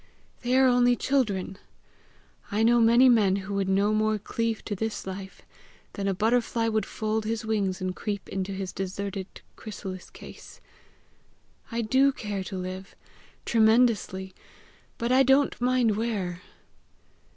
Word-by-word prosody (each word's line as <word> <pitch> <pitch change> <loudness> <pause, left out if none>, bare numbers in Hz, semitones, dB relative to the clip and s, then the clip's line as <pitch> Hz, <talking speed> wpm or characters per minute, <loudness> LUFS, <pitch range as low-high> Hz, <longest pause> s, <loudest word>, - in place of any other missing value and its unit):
They 250 +1 +1
are 265 - +6
only 245 -1 +4
children! 215 -8 -1 0.9
I 210 +2 +1
know 240 +1 +5
many 235 +3 +6
men 210 -6 +4
who 200 0 -5
would 195 -1 -1
no 200 +2 +2
more 215 0 +1
cleave 225 +2 -3
to 205 - -3
this 220 +2 -4
life 190 0 -8 0.5
than 200 -1 -3
a 195 - +1
butterfly 230 +2 +1
would 215 -2 -1
fold 220 0 -2
his 225 +1 -3
wings 200 -4 -1
and 185 0 -2
creep 205 -3 -4
into 190 0 -4
his 190 -1 -5
deserted 195 0 -4 0.3
chrysalis 190 -4 -8
case. - - -13 1.1
I 230 0 -1
do 265 +5 +4
care 205 -7 -4
to 190 - -5
live 185 +1 -6 0.5
tremendously, 220 -4 +2 0.6
but 235 0 -1
I 260 +1 +5
don't 270 0 +3
mind 245 -3 +2
where. 200 -6 -3
215 Hz, 140 wpm, -27 LUFS, 195-235 Hz, 1.1 s, are